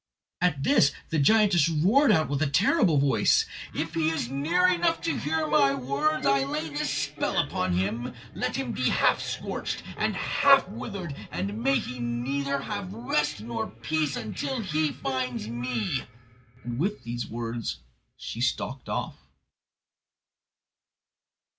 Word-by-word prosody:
At 150 -6 +1
this 140 - +4 0.2
the 160 - 0
giantess 180 -1 +4
roared 195 - +4
out 160 -1 +3
with 140 +1 -2
a 155 - +2
terrible 180 - +3
voice: 140 -1 +3 0.3
"If - - -3
he 160 -1 +1
is 150 -6 -2
near 165 +7 +2
enough 175 -1 +2
to 165 - -1
hear 160 +2 -1
my 140 -2 +3
words, 140 +4 0
I 135 0 +4
lay 150 +3 -3
this 145 -1 -2
spell 145 +5 -2 0.2
on 90 -1 0
him: 105 +7 -2 0.2
Let - - -2
him - - -2
be - - 0
half - - +3
scorched - - -4
and - - 0
half - - +4
withered; 170 - -6 0.2
and 205 +4 -3
may 270 +2 +3
he 225 - -4
have 125 - -7
neither 135 +4 -1 0.3
rest 150 - -1
nor 115 +2 -4
peace 150 +6 -2 0.2
till 265 -3 -2
he 155 -6 0
finds 125 -5 -3
me." 120 +1 -2 0.6
And 120 0 -4
with 195 -2 -1
these 120 +1 -4
words 115 -9 -4 0.4
she 115 - -6
stalked 130 +1 -2
off. - - -3
145 Hz, 145 wpm, -27 LUFS, 125-165 Hz, 0.6 s, this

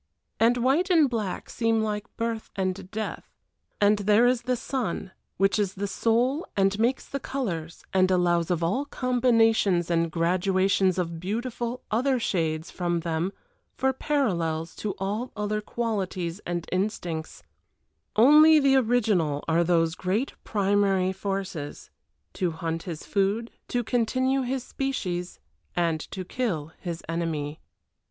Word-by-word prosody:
And 235 +2 +4
white 275 +10 +2
and 325 -5 +5
black 220 -7 -3
seem 225 -1 +1
like 210 -1 -4
birth 230 -1 -2
and 185 -1 -2
death 220 +2 -5 0.5
and 205 0 +4
there 210 +3 +4
is 245 -1 +3
the 250 +1 0
sun, 235 -6 -3 0.3
which 195 +2 +2
is 200 -2 0
the 200 +1 -2
soul 240 - +1
and 195 +1 +2
makes 240 +4 +1
the 280 - -4
colors, 175 - -4
and 185 -1 +4
allows 175 -2 +2
of 170 -2 0
all 245 +12 0
combinations 225 -9 +2
and 165 -1 +1
graduations 185 +2 +2
of 170 -2 -2
beautiful 235 +5 -3
other 255 +4 +2
shades 160 -6 -1
from 175 -2 -1
them 165 +2 -1 0.4
for 265 0 +1
parallels 170 - -1
to 205 -3 -3
all 210 +6 -3
other 210 0 -1
qualities 195 -6 -3
and 175 -1 -3
instincts, 180 -5 -3 0.7
only 300 +7 +8
the 275 -1 +4
original 210 - +1
are 165 +1 +3
those 165 -1 +2
great 195 +9 -1
primary 195 -2 +2
forces 190 -6 -4 0.4
to 180 - 0
hunt 165 0 -3
his 165 -2 -5
food, 205 +4 0 0.2
to 245 -1 -1
continue 255 +3 +1
his 255 0 -2
species, 185 -12 -3 0.4
and 170 -2 +1
to 185 -1 -5
kill 170 -10 -2
his 170 -2 -5
enemy. 160 -3 -2
200 Hz, 135 wpm, -26 LUFS, 175-240 Hz, 0.7 s, only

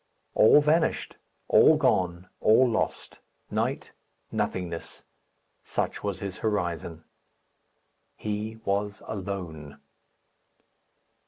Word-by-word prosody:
All 130 +7 +7
vanished, 155 +3 +1 0.3
all - - +6
gone, 90 0 +1
all 115 +4 +5
lost 115 -2 -2 0.3
night - - -2 0.4
nothingness. 85 -3 -4 0.6
Such - - -3
was 100 -2 -3
his 100 -2 -5
horizon. 85 -6 -2 1.1
He 110 +1 -4
was 100 +1 -1
alone. 90 -8 -6
100 Hz, 80 wpm, -27 LUFS, 85-110 Hz, 1.1 s, All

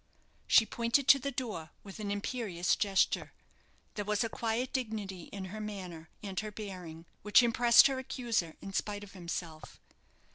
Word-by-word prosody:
She 225 - +6
pointed 235 +5 +1
to 275 - +9
the 280 +2 -2
door 220 -12 -4
with 200 +1 -10
an 210 -1 -3
imperious 205 -3 -1
gesture. 200 -2 +1 0.6
There 205 - -3
was 210 +2 0
a 230 - -2
quiet 230 +3 -2
dignity 210 -8 -3
in 195 -2 -7
her 215 - -5
manner 180 -6 -7
and 195 -2 -3
her 215 - -4
bearing 180 -6 -8 0.2
which 210 +4 +6
impressed 235 0 +6
her 270 -1 +2
accuser 235 - -2
in 195 - -7
spite 205 +1 -2
of 200 - -11
himself. 170 -3 -6
210 Hz, 160 wpm, -32 LUFS, 190-235 Hz, 0.6 s, to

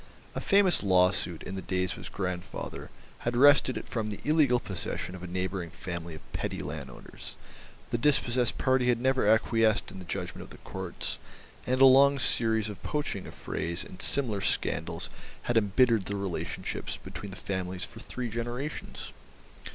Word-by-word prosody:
A - - -3
famous 195 -2 +4
law 90 -2 +5
suit, 90 -4 -2
in - - -6
the 95 - -3
days 90 -1 -1
of - - -4
his - - -8
grandfather, 90 -2 -5 0.3
had 120 0 -1
wrested 140 -1 +6
it - - -6
from 110 -3 -2
the 105 - -5
illegal 145 -5 +4
possession 90 -2 -4
of 95 - -8
a 90 - -6
neighbouring 90 0 -3
family 85 -1 -6
of 80 - -15
petty - - -3
landowners; 70 -4 -8 0.6
the 120 - 0
dispossessed 125 -3 +2
party 130 -1 +2
had 120 -2 +3
never 130 -2 +2
acquiesced 110 -1 +3
in 95 - -9
the 90 - -9
judgment - - -4
of - - -10
the - - -11
Courts, - - -4 0.5
and 130 +1 +1
a - - +10
long 140 +2 +7
series 110 -3 +3
of 105 -2 -8
poaching 145 -10 -3
affrays 85 +1 -3
and 95 - -10
similar 115 -8 +1
scandals 85 -2 -1 0.3
had 120 - -1
embittered 110 0 +4
the 100 - -3
relationships 100 -3 -4
between 100 - -8
the 95 - -8
families 95 -1 -3
for 110 - -12
three 125 +1 -5
generations. 120 +6 -5
110 Hz, 170 wpm, -29 LUFS, 90-125 Hz, 0.6 s, a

